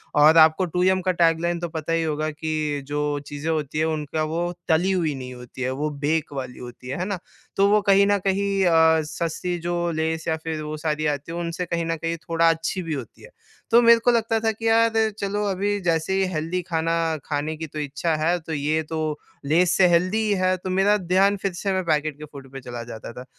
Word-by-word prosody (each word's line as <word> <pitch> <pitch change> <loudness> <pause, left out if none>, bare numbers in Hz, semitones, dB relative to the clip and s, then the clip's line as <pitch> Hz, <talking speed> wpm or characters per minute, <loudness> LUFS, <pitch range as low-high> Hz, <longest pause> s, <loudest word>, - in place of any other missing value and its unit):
और 150 +2 +6
आपको 160 +3 +6
टू 180 +1 -1
यम 185 0 +3
का 185 0 +1
टैगलाइन 170 0 +1
तो 175 0 -4
पता 160 0 -3
ही 165 0 +1
होगा 155 0 -1
कि 155 -1 -2
जो 145 0 -1
चीज़ें 145 +2 -5
होती 155 -2 -2
हैं 155 - +2
उनका 155 -1 -2
वो 170 +3 -2 0.2
तली 175 +3 +2
हुई 170 -5 0
नहीं 130 -1 -7
होती 125 +1 -11
है 130 0 0
वो 150 - 0 0.2
बेक 155 -1 0
वाली 130 -2 -6
होती 125 0 -10
हैं। 130 - -3
है 180 - -1
ना? 195 -2 -3 0.4
तो 195 0 +4
वो 210 +1 +4
कहीं 200 0 +5
न 205 0 +3
कहीं 195 0 +1
अ, 160 -2 +5
सस्ती 170 +3 -3
जो 175 0 -1
लेस 160 0 -2
या 160 - +1
फ़िर 160 -1 -4
वो 150 0 -5
सारी 155 0 -2
आती 145 +1 -2
है 170 - -5
उनसे 170 +1 -3
कहीं 170 -1 -2
न 165 0 -1
कहीं 165 +1 -3
थोड़ा 165 0 +2
अच्छी 165 +3 -1
भी 165 -2 -3
होती 130 -7 -7
है। - - -12 0.4
तो 235 +1 +7
मेरे 235 -1 +7
को 245 +2 +3
लगता 225 -1 +1
था 225 0 +1
कि 225 +1 -4
यार 225 0 +4 0.3
चलो 205 +1 -1
अभी 200 +1 0
जैसे 165 0 0
ही 190 0 +2
हेल्दी 165 +3 -2
खाना 165 0 0 0.3
खाने 150 +1 -2
की 160 +1 -5
तो 155 +1 -7
इच्छा 150 +3 -1
है 160 +3 +1
तो 160 -1 -7
ये 155 +2 0
तो 160 - -3 0.5
लेस 170 +5 +3
से 185 - +6
हेल्दी 185 +6 +2
है। 185 0 +2
तो 185 +1 -6
मेरा 195 +3 +3
ध्यान 190 +2 +2
फ़िर 195 -1 -3
से 195 +3 -2
मैं 190 0 0
पैकेट 155 -2 0
के 150 - -8
फूड 135 -2 -11
पे 135 0 -8
चला 120 -1 -6
जाता 115 -1 -8
था। 125 +1 -9
165 Hz, 235 wpm, -23 LUFS, 155-185 Hz, 0.5 s, तो